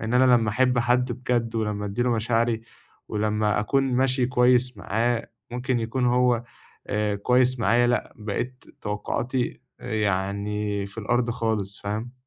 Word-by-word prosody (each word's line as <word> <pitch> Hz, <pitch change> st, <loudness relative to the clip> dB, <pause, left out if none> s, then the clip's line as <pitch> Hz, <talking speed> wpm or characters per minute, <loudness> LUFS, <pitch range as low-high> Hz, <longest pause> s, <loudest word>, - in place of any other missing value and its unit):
إن 115 Hz, +2 st, -2 dB
أنا 125 Hz, 0 st, +6 dB
لمّا 110 Hz, -2 st, 0 dB
أحب 125 Hz, +2 st, +2 dB
حد 125 Hz, +1 st, +2 dB
بجد 120 Hz, -1 st, -1 dB
ولمّا 105 Hz, -2 st, -1 dB
أدي 100 Hz, +5 st, -1 dB
له 125 Hz, -, +1 dB
مشاعري، 115 Hz, 0 st, +1 dB, 0.5 s
ولمّا 105 Hz, 0 st, +1 dB
أكون 135 Hz, +6 st, +1 dB
ماشي 130 Hz, 0 st, +2 dB
كويّس 125 Hz, 0 st, +3 dB
معاه 115 Hz, +3 st, -1 dB, 0.2 s
ممكن 125 Hz, 0 st, -1 dB
يكون 125 Hz, +2 st, -1 dB
هو 125 Hz, -1 st, +3 dB, 0.5 s
آآ، 105 Hz, 0 st, 0 dB
كويّس 125 Hz, +4 st, +2 dB
معايا، 120 Hz, +2 st, +3 dB
لأ، 120 Hz, -, 0 dB
بقيت 120 Hz, +4 st, -4 dB, 0.2 s
توقعاتي، 120 Hz, +4 st, -2 dB, 0.2 s
آآ، 125 Hz, -2 st, -6 dB
يعني 100 Hz, 0 st, -1 dB
في 100 Hz, -, -15 dB
الأرض 120 Hz, +3 st, 0 dB
خالص. 110 Hz, -4 st, -2 dB
فاهم؟ 110 Hz, +4 st, -3 dB
120 Hz, 145 wpm, -25 LUFS, 105-125 Hz, 0.5 s, أنا